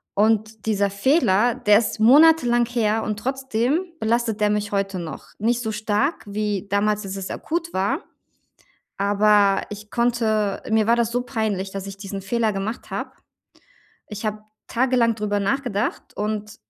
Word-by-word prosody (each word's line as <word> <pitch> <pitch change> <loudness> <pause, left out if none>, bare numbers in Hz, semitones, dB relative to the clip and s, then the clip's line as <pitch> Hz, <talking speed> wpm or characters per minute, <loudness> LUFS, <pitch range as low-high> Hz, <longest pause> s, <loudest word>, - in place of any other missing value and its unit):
Und 220 +1 +1
dieser 200 -2 +2
Fehler, 230 - +2
der 210 0 +4
ist 225 -1 -3
monatelang 245 -1 +5
her 225 -2 0
und 210 -1 -3
trotzdem 265 - -1
belastet 225 -1 0
der 210 - +3
mich 210 -1 -1
heute 195 -1 -1
noch. 160 -2 -7
Nicht 235 +3 +1
so 220 - -2
stark 215 +8 -1
wie 205 -1 -2
damals, 205 +1 +1
als 195 0 -5
es 190 - -5
akut 335 +1 -3
war, 200 - 0 1.0
aber 205 0 +3
ich 210 0 -9
konnte 225 -4 0
mir 220 -1 +3
war 235 - +5
das 235 -1 +1
so 245 0 0
peinlich, 215 -6 -2
dass 195 0 -5
ich 195 0 -8
diesen 195 0 -6
Fehler 225 +1 0
gemacht 195 +4 -5
habe. - - -4 1.0
Ich 215 +1 -7
habe 215 0 -3 0.3
tagelang 240 -2 +2
drüber 205 -1 -1
nachgedacht 205 0 -2
und 210 0 -3
215 Hz, 155 wpm, -22 LUFS, 205-235 Hz, 1.0 s, monatelang